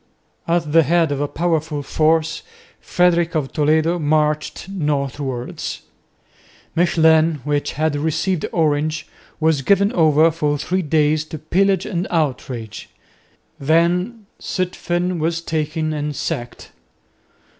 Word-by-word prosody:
At 165 -2 0
the 165 +1 +6
head 165 0 +2
of 140 0 -2
a 145 - 0
powerful 160 -2 -1
force, 160 +3 +1 0.4
Frederick 175 -1 +1
of 145 -4 -2
Toledo 160 +3 +2
marched 150 +1 0
northwards. 140 -7 -3 0.9
Mechlin, 160 -2 +3
which 145 0 -1
had 155 +1 0
received 160 +4 -1
Orange, 155 -1 0 0.3
was 160 -3 +2
given 200 +7 +3
over 160 -1 +4
for 150 -2 -1
three 185 +6 -1
days 155 -1 +2
to 155 - -7
pillage 190 +5 +1
and 180 -2 -2
outrage. 130 - -3 0.7
Then 175 - +1 0.2
Zutphen 180 -1 -2
was 165 +1 0
taken 155 -1 -2
and 150 -1 -3
sacked. 120 -2 -5
155 Hz, 115 wpm, -20 LUFS, 150-170 Hz, 0.9 s, the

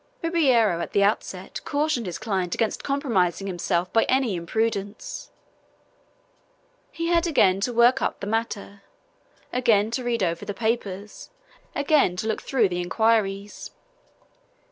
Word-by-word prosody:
Ribeiro 255 - +3
at - - -5
the 200 - +4
outset 195 -2 -2
cautioned 290 -6 -1
his 175 - -4
client 190 -5 -2
against 225 -2 -1
compromising 215 - 0
himself 180 -1 -1
by 225 - +4
any 260 -5 +1
imprudence. 200 +3 -3 1.6
He 335 0 -3
had 340 0 +3
again 195 - +3
to 245 - 0
work 240 +3 +4
up - - -1
the - - -5
matter, 205 -2 -3 0.7
again 225 -4 +3
to 255 +2 -2
read 235 -3 0
over 170 +1 -1
the 205 -1 -5
papers, 215 -3 -3 0.5
again 285 - +3
to 180 - -4
look 220 - -1
through 235 -7 +1
the 180 0 -2
inquiries. 205 +1 0
220 Hz, 135 wpm, -24 LUFS, 195-245 Hz, 1.6 s, the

